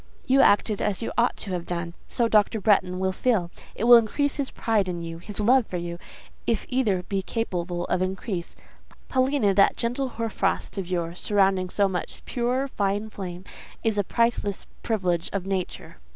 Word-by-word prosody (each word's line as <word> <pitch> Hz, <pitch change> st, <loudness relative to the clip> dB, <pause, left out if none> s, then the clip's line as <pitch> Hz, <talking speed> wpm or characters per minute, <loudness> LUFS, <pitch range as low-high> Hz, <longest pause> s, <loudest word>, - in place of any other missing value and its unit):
"You 270 Hz, +1 st, +5 dB
acted 205 Hz, -2 st, +3 dB
as 210 Hz, +1 st, -1 dB
you -, -, -3 dB
ought 235 Hz, +1 st, +2 dB
to 200 Hz, -, -6 dB
have 175 Hz, -2 st, -3 dB
done; 170 Hz, -1 st, -3 dB
so 235 Hz, -, +1 dB
Dr. 215 Hz, 0 st, +3 dB
Bretton 190 Hz, -3 st, +2 dB
will 190 Hz, 0 st, 0 dB
feel: 190 Hz, -4 st, 0 dB, 0.2 s
it -, -, -4 dB
will 240 Hz, 0 st, +9 dB
increase 270 Hz, +6 st, 0 dB
his 280 Hz, -2 st, -1 dB
pride 215 Hz, -4 st, 0 dB
in 175 Hz, -1 st, -4 dB
you, 165 Hz, 0 st, -6 dB
his 205 Hz, +4 st, -8 dB
love 240 Hz, +3 st, +4 dB
for 180 Hz, -, -4 dB
you, 170 Hz, 0 st, -5 dB, 0.5 s
if 230 Hz, -3 st, 0 dB
either 220 Hz, -8 st, +1 dB
be 195 Hz, +1 st, -2 dB
capable 180 Hz, -5 st, -3 dB
of 180 Hz, -, 0 dB
increase. 185 Hz, -1 st, -3 dB, 0.5 s
Paulina, 260 Hz, -5 st, +2 dB
that 195 Hz, +1 st, +4 dB
gentle 250 Hz, +3 st, -1 dB
hoar 230 Hz, -2 st, -3 dB
frost -, -, -1 dB
of 185 Hz, -2 st, -5 dB
yours, 175 Hz, -1 st, -2 dB
surrounding 195 Hz, -3 st, +2 dB
so 200 Hz, +2 st, +2 dB
much 185 Hz, -2 st, -5 dB
pure, 250 Hz, +2 st, 0 dB
fine 205 Hz, -2 st, -1 dB
flame, 180 Hz, -3 st, -6 dB, 0.4 s
is 220 Hz, -3 st, +1 dB
a -, -, +3 dB
priceless 230 Hz, -2 st, 0 dB, 0.2 s
privilege 180 Hz, -6 st, 0 dB
of 195 Hz, -2 st, -2 dB
nature." 190 Hz, -2 st, -4 dB
200 Hz, 180 wpm, -25 LUFS, 180-230 Hz, 0.5 s, will